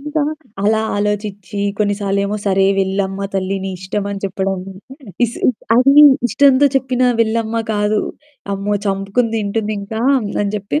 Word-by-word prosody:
ఇంకా 300 +2 -2 0.4
అలా 215 +2 +2 0.2
ఆలోచిచ్చి 205 -1 -3 0.2
కొన్ని 205 -1 +1
సార్లేమో, 200 +1 -1
"సరే 195 0 +3
వెళ్ళమ్మ 195 0 -1
తల్లి! 195 0 -1
నీ 195 - -3
ఇష్టం." 195 +2 -3
అని 200 - -5
చెప్పడం. 195 0 -2 0.7
ఇస్ 235 - -4 0.4
అది 265 +3 +5 0.3
ఇష్టంతో 280 +1 +4
చెప్పిన 260 -1 0 0.2
వెళ్ళమ్మ 230 0 0
కాదు, 210 0 +1 0.5
"అమ్మో! 200 +1 -2
చంపుకుని 195 +4 0
తింటుందింకా" 215 0 -3 0.4
అని 200 - -1
జెప్పి. 205 +9 -2
205 Hz, 130 wpm, -17 LUFS, 195-225 Hz, 0.7 s, అది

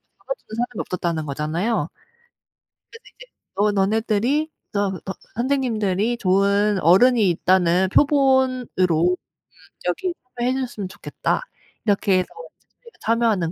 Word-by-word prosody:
잡아주는 - - -9
사람이 245 +1 -3
없었다는 170 -3 -2
거잖아요. 155 +6 -1 1.0
그래서 460 - -12
이제 - - -16 0.5
"너 205 +2 +2
너네들이 220 +9 +1 0.2
저 205 -1 +1 0.2
어 190 - -3 0.2
선생님들이 235 -4 0
좋은 200 +1 +2
어른이 210 +4 +5
있다는 180 +1 +2
표본으로 265 -1 +3 0.4
음 - - 0 0.7
여기 365 -2 -1 0.3
참여해 245 +2 +1
주셨으면 240 -7 -4
좋겠다." - - -2 0.4
이렇게 200 -3 +2
해서 180 - -2 0.3
이제 - - -39 0.2
저희가 470 -1 -17
참여하는 225 -7 +1
210 Hz, 315 characters per minute, -22 LUFS, 185-250 Hz, 1.0 s, 어른이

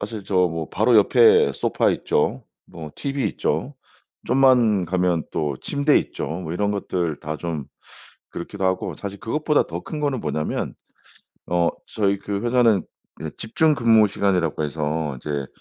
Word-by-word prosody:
사실 105 -1 -6
저 95 - -2
뭐 80 -1 -5
바로 110 +3 +3
옆에 115 +3 +5
소파 - - +1
있죠. 75 - 0 0.2
뭐 80 -2 -9
티비 140 -1 -2
있죠. - - -2 0.5
좀만 120 -7 +4
가면 90 -2 0
또 75 -3 -1
침대 145 +1 +2
있죠. - - -5
뭐 85 0 -5
이런 100 +3 0
것들 90 -6 -2
다 75 +1 -4
좀 80 -3 -4 0.7
그렇기도 95 +3 -6
하고 95 0 0
사실 100 -1 -7
그것보다 150 +5 +1
더 - - -5
큰 155 -2 -6
거는 140 -4 -1
뭐냐면 75 -6 -3 0.7
어 85 -1 +2 0.2
저희 100 -2 0
그 100 0 -4
회사는 120 -4 +3 0.4
예 - - -4
집중 155 +6 +1
근무시간이라고 100 - +2
해서 75 0 -2
인제 70 +1 -4
100 Hz, 280 characters per minute, -22 LUFS, 80-115 Hz, 0.7 s, 옆에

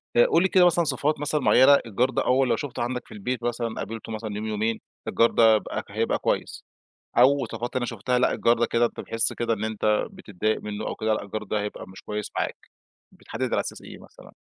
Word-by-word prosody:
آآ، 120 - +6
قُل 170 +3 +3
لي - - +4
كده 185 -2 +5
مثلًا 175 -1 +4
صِفات 150 -1 0
مثلًا 150 +1 0
مُعيّنة 140 +2 +6
الجار 120 +4 +1
ده 130 - -1
أول 130 0 +3
لو - - +3
شُفتُه 145 -5 -4
عندك 125 +1 -4
في - - -12
البيت 120 +4 -4
مثلًا 120 -1 -2
قابلته 115 0 -6
مثلًا 110 -1 -5
يوم، 105 +1 -4
يومين، 110 +1 -1 0.3
الجار 115 - +3
ده 110 -1 +5
هب 105 - -1 0.3
هيبقى 110 +3 -1
كويّس، - - -2 0.5
أو 135 +2 +5
صفات 120 +1 -5
أنا 125 -1 0
شُفتَها 120 +2 -1
لأ، - - +3
الجار 115 0 +2
ده 120 - +3
كده 120 +1 +2
أنت - - -5
بتحِس 115 0 +1
كده 115 -1 -1
إن 110 -1 -4
إنت 110 -1 0
بتتضايق 110 - -3
مِنّه 105 0 -5
أو - - -3
كده 110 0 0
لأ، 105 - -2
الجار 105 +2 -5
ده 105 0 -2
هيبقى 105 - -6
مش 95 - -12
كويس 105 0 -5
معاك. - - -2 0.5
بتحدد - - -5
على - - +2
أساس - - -5
إيه - - -11
مثلًا؟ - - -16
115 Hz, 230 wpm, -25 LUFS, 110-125 Hz, 0.5 s, آآ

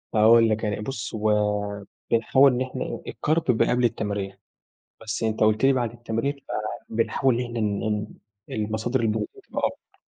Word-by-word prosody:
هاقول 115 +1 +6
لك، 110 +1 0
يعني 105 -1 -1
بُص، 110 -2 -5
هو 105 -1 0 0.3
بنحاول 130 +4 +5
إن 125 - -1
إحنا 130 0 -4
الcarb 160 +2 0
بيبقى 110 - +2
قبل 125 0 +2
التمرين. 100 -4 -2 0.6
بس 110 0 -3
أنت 110 -1 -1
قُلت 110 +3 +3
لي 135 - +5
بعد 120 -4 0
التمرين 120 +4 -2 0.5
فبنحاول 115 +3 +1
إن 125 - -1
إحنا 120 -1 -5
إن 105 -2 0
إن 105 -1 -1 0.4
المصادر 110 +4 -1
البروتين 110 -1 -2
تبقى - - -4
أكتر. - - -13
110 Hz, 160 wpm, -25 LUFS, 105-120 Hz, 0.6 s, هاقول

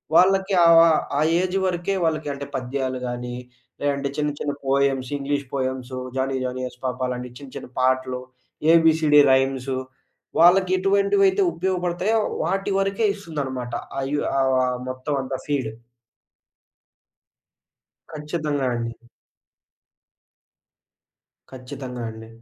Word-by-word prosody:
వాళ్ళకి 190 +3 +4
ఆ - - +7
వా 165 0 +8 0.3
ఆ - - +2 0.2
ఏజ్ 185 +1 -1
వరికే 180 +1 -1
వాళ్ళకి 155 -2 -1
అంటే, 140 0 -6
పద్యాలు 130 0 -2
గానీ, 120 0 -4 0.5
లేదంటే 140 -1 0
చిన్న 150 0 +1
చిన్న 145 - -2
poems, 135 -1 +1
English 140 0 -2
poems 130 -1 -3 0.2
'Johnny 135 0 0
Johnny 130 0 -3
yes 125 0 -13
పాప' 130 0 -2
అలాంటి 125 0 -4
చిన్న 140 -2 -11
చిన్న - - -9
పాటలు. 130 0 +1 0.5
ఏబీసీడీ 160 -2 +5
రైమ్సు 130 0 +1 0.6
వాళ్ళకి 180 +2 +6
ఎటువంటివైతే 195 0 +3
ఉపయోగపడతాయో, 180 +4 0 0.2
వాటి 195 +4 -1
వరకే 195 +3 0
ఇస్తుందనమాట. 140 - -5 0.3
ఆ - - -1
యు 150 - +1 0.2
ఆహ్, 130 -1 +2
మొత్తమంతా 130 0 -3
ఫీడ్. 135 -6 -1 2.4
ఖచ్చితంగా 150 -2 -2
అండి. 115 0 -3 2.6
ఖచ్చితంగా 125 -1 -7
అండి. 110 0 -10
140 Hz, 110 wpm, -23 LUFS, 130-170 Hz, 2.6 s, వా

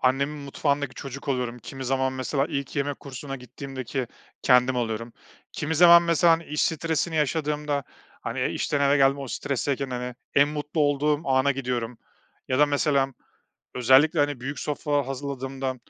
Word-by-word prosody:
annemin 140 +3 +1
mutfağındaki 140 -1 -1
çocuk 140 +1 -8
oluyorum. 125 -2 -1
Kimi 135 +3 -8
zaman, 130 +1 0
mesela, 135 +2 -1
ilk 140 -3 -4
yemek 140 0 -2
kursuna 135 0 -7
gittiğimdeki 130 0 -5 0.4
kendim 125 0 +4
oluyorum, 115 -1 -3 0.4
kimi 155 +1 -2
zaman, 170 +1 +8
mesela, 170 0 +4
hani, 165 0 0
iş 150 0 -1
stresini 160 +1 0
yaşadığımda, 150 -1 0 0.4
hani, - - -1
işten 145 - -1
eve 140 +1 +4
geldim, 135 0 +4
o 135 - -6
stresteyken, 140 +2 -2
hani, 125 0 -4 0.2
en 145 +1 +5
mutlu 150 +1 -3
olduğum 145 +1 +2
ana 130 +1 +3
gidiyorum 125 -3 -3 0.5
ya 130 +1 +1
da 150 - +6
mesela, 140 -2 +1 0.6
özellikle, 135 +6 +5
hani, 145 -3 +1
büyük 140 +4 -5
sofralar 145 -1 -1
hazırladığımda, 135 -1 -4
140 Hz, 150 wpm, -25 LUFS, 130-145 Hz, 0.6 s, zaman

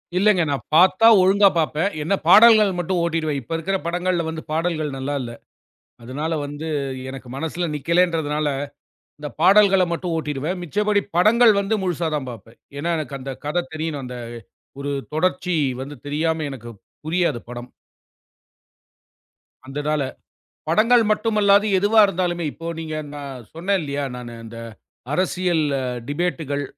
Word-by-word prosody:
இல்லங்க. 195 0 +4
நான் 140 -4 -3
பாத்தா 185 +6 +6
ஒழுங்கா 195 +2 +5
பாப்பேன். 160 +3 0
என்ன 165 - 0
பாடல்கள் 220 -2 +8
மட்டும் 175 +1 -1
ஓட்டிடுவேன். 160 -4 -1
இப்ப 120 - -7
இருக்குற 195 +4 -1
படங்கள்ல 170 -2 -2
பாடல்கள் 155 -3 -1
நல்லா 135 +2 -3
இல்ல. 120 -2 -6 0.7
அதனால 145 +7 -3
வந்து 145 +2 -6 0.4
எனக்கு 135 -1 -9
மனசுல 160 +4 -3
நிக்கலைன்றதுனால 160 -1 +1 0.7
இந்தப் 150 -4 -8
பாடல்கள 195 +1 +6
மட்டும் 170 0 -3
ஓட்டிடுவேன். 155 +3 -3
மிச்சபடி 205 +4 +1 0.2
படங்கள் 225 +5 +6
வந்து 200 +2 0
முழுசா 175 -3 -1
தான் 140 -3 -4
பார்ப்பேன். 115 0 -13 0.2
ஏன்னா 170 +4 -1
எனக்கு 150 -3 -5
அந்தக் 130 0 -7
கதை 175 +4 0
தெரியனும். 155 -3 -4
அந்த 125 0 -7 0.7
ஒரு 145 0 -3 0.2
தொடர்ச்சி 180 +1 0 0.3
வந்து 140 +2 -8
தெரியாம 160 +2 -1
எனக்குப் 120 -5 -10 0.2
புரியாது 160 -5 0
படம். 120 0 -8 2.0
அந்ததால 145 +2 -2 0.7
படங்கள் 230 +8 +4
மட்டுமல்லாது 210 -1 +3
எதுவா 205 +3 +4
இருந்தாலுமே. 175 -2 -2
இப்போ 165 - -10
நீங்க 155 -1 -5 0.2
நா 145 - -7 0.3
சொன்னேன் 190 +4 0
இல்லையா? 145 -1 -3
நானு 120 -1 -8
அந்த 115 +1 -10 0.5
அரசியல் 180 -1 0 0.4
டிபேட்டுகள், 145 -2 -2
165 Hz, 130 wpm, -22 LUFS, 145-185 Hz, 2.0 s, பாடல்கள்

